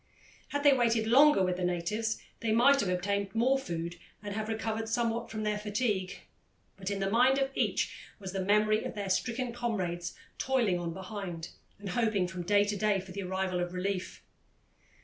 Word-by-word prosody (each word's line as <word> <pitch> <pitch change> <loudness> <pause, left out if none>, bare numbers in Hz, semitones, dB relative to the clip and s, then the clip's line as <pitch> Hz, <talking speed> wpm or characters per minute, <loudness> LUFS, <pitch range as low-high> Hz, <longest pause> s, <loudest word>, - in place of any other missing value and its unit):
Had 285 0 -2
they 285 -1 +7
waited 235 -3 +2
longer 265 -1 +6
with 180 -1 0
the 185 - -3
natives, 180 +6 -1 0.2
they 225 - -1
might 255 +5 +5
have 200 - 0
obtained 200 +3 -1
more 260 +4 +3
food 170 -6 -4 0.3
and 205 -1 -4
have 215 +1 -3
recovered 225 0 -2
somewhat 230 0 0
from 215 -1 -4
their 210 0 0
fatigue, 210 -3 -1 0.5
but 190 0 -5
in 200 -1 -2
the 195 0 0
mind 250 +4 +5
of 270 0 0
each - - 0 0.2
was 190 -2 -7
the 190 -1 -1
memory 210 +2 +3
of - - -5
their 200 -2 -2
stricken 240 +5 -1
comrades 185 -8 -2 0.2
toiling 235 -9 +1
on 170 -1 -3
behind, 185 -3 -6 0.3
and 200 -1 -7
hoping 210 -2 +1
from 185 -1 -5
day 205 +3 +4
to 205 0 -1
day 205 -1 +2
for 190 0 -9
the 200 +2 -5
arrival 190 -1 -1
of 175 0 -3
relief. 185 0 -3
205 Hz, 190 wpm, -30 LUFS, 185-230 Hz, 0.5 s, they